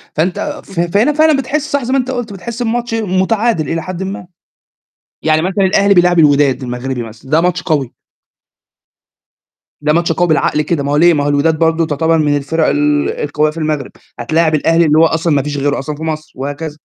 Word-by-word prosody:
فأنت 175 +4 -2
ف 195 -3 -7
فهنا 205 - +2
فعلًا 310 -1 +3
بتحس، 295 +3 -2
صح 285 -2 0
زَي 255 +3 -2
ما 270 - +3
أنت 255 +1 -2
قُلت، 240 -5 -4
بتحس 235 +5 -5
بماتش 235 0 -2
متعادل 200 - 0
إلى 165 0 -2
حد 185 0 -5
ما. 190 -2 -6 1.0
يعني 155 0 +2
مثلًا 190 +2 0
الأهلي 200 +1 +3
بيلاعب 175 -1 +3
الوداد 145 -4 +3
المغربي 125 0 -4
مثلًا، 115 +4 -12
ده 160 +1 +4
ماتش 180 0 0
قوي. 145 -7 -1 1.9
ده 150 0 +1
ماتش 170 0 +1
بالعقل 155 -2 +1
كده، 150 -1 -1
ما 140 - -2
هو 145 - +2
ليه؟ 170 +1 +5
ما 145 -1 0
هو 145 - 0
الوداد 155 +2 +1
برضه 165 0 +2
تُعتبر 160 +2 +1
من 145 -2 +1
الفرق 155 +3 -1
ال 145 0 +1
القوية 150 +1 -1
في 165 - -14
المغرب، 155 -4 -2 0.3
هتلاعب 155 +5 +1
الأهلي، 165 +2 +2
اللي 150 0 +3
هو 165 - +6
أصلًا 160 0 0
ما 140 - +1
فيش 145 -1 -4
غيره 145 +1 0
أصلًا 145 +2 -5
في 160 - -9
مصر، 155 -1 -4
وهكذا. 145 +3 -5
160 Hz, 200 wpm, -15 LUFS, 145-190 Hz, 1.9 s, هو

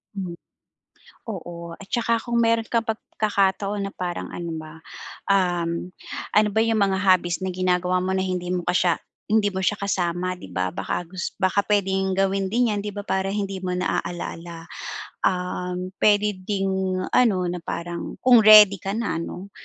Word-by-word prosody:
Mhm. 180 -3 -5 0.9
Oo, 170 -3 -7
at 200 - -11
tsaka 230 -1 +2
kung 235 -1 +1
meron 230 0 +2
kang 230 0 0
pagkakataon 205 -2 0
na 195 - -6
parang 175 -1 -4
ano 170 -1 -5
ba, 155 0 -9 0.5
um, 175 -3 +1 0.5
ano 210 0 +6
ba 220 - +2
yung 225 0 +2
mga 190 -1 0
hobbies 185 -3 +3
na 190 - -2
ginagawa 180 0 +1
mo 190 - 0
na 190 - +1
hindi 180 -1 -2
mo 180 - 0
pa 175 +1 0
siya 175 -2 +3 0.3
hindi 210 -1 +2
mo 190 - -4
siya 190 +2 +1
kasama, 185 -2 -1
di - - -10
ba, 90 0 -2
baka 95 - -3
gus 185 +2 -6
baka 190 +1 0
puwedeng 195 -2 +1
gawin 195 0 +1
din 235 +3 +2
yan 210 - -1
di 205 - -4
ba, 205 - -4
para 190 -1 -1
hindi 195 -2 -2
mo 185 -1 -3
naalala. 170 -2 -4 0.6
Um, 180 0 -1
puwede 210 0 +4 0.2
ding 195 -2 0 0.4
ano, 235 -6 +4
na 180 - -3
parang 170 0 -5
kung 250 -2 +7
ready 210 -2 +9
ka 195 - -3
na 230 -7 -1
ano, 180 +3 -6
190 Hz, 170 wpm, -24 LUFS, 180-205 Hz, 0.9 s, ready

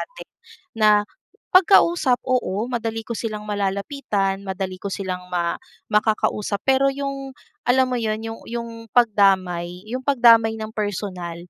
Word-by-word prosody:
atin. - - -9 0.5
Na 215 -1 +3 0.6
'pag 370 -1 +6
kausap 300 -8 +2
oo, 240 -5 0
madali 225 -2 -3
ko 235 - -5
silang 215 -2 -4
malalapitan, 200 0 -2
madali 190 -1 -5
ko 200 - -4
silang 185 -2 -5
ma 170 -1 -2 0.3
makakausap, 210 -1 +1
pero 270 +1 +3
'yong 275 -1 -5 0.3
alam 260 +1 +5
mo 245 - 0
'yon, 220 0 -2
'yong 225 0 -6
'yong 235 0 -4 0.3
pagdamay 190 -5 +2
'yong 255 - -2
pagdamay 230 -4 +5
nang 220 0 -6
personal, 190 -5 -4
215 Hz, 135 wpm, -22 LUFS, 195-245 Hz, 0.6 s, pag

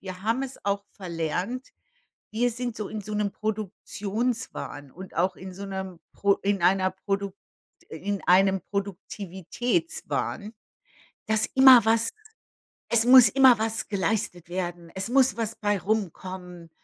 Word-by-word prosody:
wir 185 -1 -8
haben 230 +5 0
es 270 -1 -6
auch 200 0 0
verlernt 180 - -4 0.7
wir 245 +3 +2
sind 240 0 -4
so 210 - -4
in 215 -1 -6
so 210 +1 -7
'nem 210 -1 0
Produktionswahn 215 - -4
und 185 +5 -11
auch 185 0 +1
in 185 0 -9
so 200 +2 -7
'nem 190 -3 -6
pro 200 0 +2
in 200 -1 -1
einer 185 +2 +3
Produkt 195 +1 -3 0.5
in 195 +5 -4
einem 190 +1 +4
Produktivitätswahn, 200 - -3 0.7
dass 220 -1 +2
immer 265 -2 +9
was 225 +1 +3 0.8
es 235 0 +4
muss 250 -3 +9
immer 260 -2 +6
was 220 0 -1
geleistet 185 -3 -2
werden, 175 -2 -4
es 190 +3 -1
muss 260 -1 +3
was 225 0 -2
bei 205 -1 0
rumkommen, 185 -3 -4
200 Hz, 135 wpm, -26 LUFS, 185-225 Hz, 0.8 s, immer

